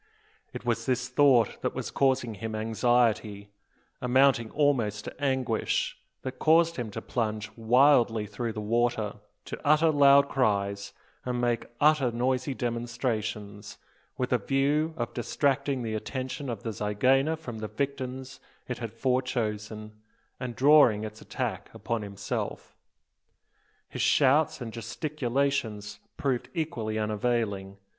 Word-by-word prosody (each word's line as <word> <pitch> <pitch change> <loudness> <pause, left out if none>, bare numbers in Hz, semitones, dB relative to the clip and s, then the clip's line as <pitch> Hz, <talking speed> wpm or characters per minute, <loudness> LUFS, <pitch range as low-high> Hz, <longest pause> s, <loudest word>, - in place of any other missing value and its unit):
It 115 - -8
was 115 -1 -1
this 125 0 0
thought 125 -4 +3
that - - -2
was - - -4
causing 130 -4 +1
him 110 +1 -5
anxiety, 110 -2 +1 0.5
amounting 125 -2 +3
almost 120 -9 +1
to - - -8
anguish, 130 -5 0 0.3
that 130 0 -6
caused 165 +1 +4
him 120 -3 -3
to 105 - -7
plunge 110 -3 -2
wildly 120 -1 +4
through 110 +3 -4
the 105 - -5
water, 115 -1 0 0.3
to - - -7
utter 155 +2 +4
loud 140 -1 +6
cries, 100 -7 0 0.3
and 125 -1 -2
make 120 -1 0
other 150 -4 +4
noisy 130 +3 -1
demonstrations, 115 -4 -3 0.4
with 125 0 -1
a 125 - +3
view 145 +7 +1
of 120 - -3
distracting 140 +1 0
the 110 -1 -3
attention 130 +5 -4
of 115 -4 -5
the 115 - -3
zygaena 130 +10 +2
from 120 -8 -8
the 110 - -4
victims 130 0 -4 0.3
it 125 - -4
had 115 -3 -5
fore 130 +2 +1
chosen, 110 -3 -4 0.4
and 125 -2 -5
drawing 130 -5 +5
its 110 0 -7
attack - - -4
upon 115 -1 -3
himself. 100 -1 -5 1.1
His - - -5
shouts 145 +1 +3
and 115 -2 -6
gesticulations 120 -4 -2 0.2
proved 130 -4 -1
equally 120 -10 -2
unavailing. 105 -2 -1
120 Hz, 130 wpm, -28 LUFS, 110-135 Hz, 1.1 s, loud